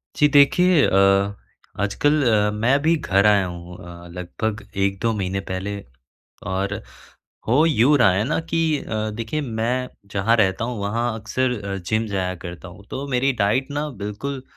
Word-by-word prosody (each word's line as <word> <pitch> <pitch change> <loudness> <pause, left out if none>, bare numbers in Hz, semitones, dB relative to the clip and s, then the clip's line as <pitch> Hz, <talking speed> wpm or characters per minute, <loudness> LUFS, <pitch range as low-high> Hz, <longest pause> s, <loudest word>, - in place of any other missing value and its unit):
जी 150 - +4
देखिए, 145 +4 +5
अ, 100 +1 +3 0.4
आजकल 145 +9 +1
अ, 105 -2 +3
मैं 115 +7 +2
भी 160 +2 +3
घर 100 -8 +1
आया 100 -2 +4
हूँ 90 0 -8
अ, 85 0 -11
लगभग 105 +6 -4 0.2
1-2 100 +4 0
महीने 95 -2 -2
पहले, 100 +2 -3 0.6
और 95 +2 -3 0.7
हो 135 +7 +4
यूँ 145 -1 +4
रहा 95 - +6
है 100 +3 +1
ना 145 +7 0
कि 165 - +1 0.2
अ, 110 -3 -3
देखिए 115 +7 -3
मैं 125 0 -2 0.2
जहाँ 105 +4 +2
रहता 100 0 +1
हूँ 120 -1 -4
वहाँ 115 +3 -1
अक्सर 125 +3 -1 0.3
जिम 110 +3 0
जाया 95 -3 -2
करता 85 +1 -8
हूँ 90 +3 -14
तो 135 +2 -4
मेरी 135 +1 +1
डाइट 125 +7 +1
ना 145 +1 -2
बिल्कुल 130 +7 -4
110 Hz, 160 wpm, -22 LUFS, 95-130 Hz, 0.7 s, रहा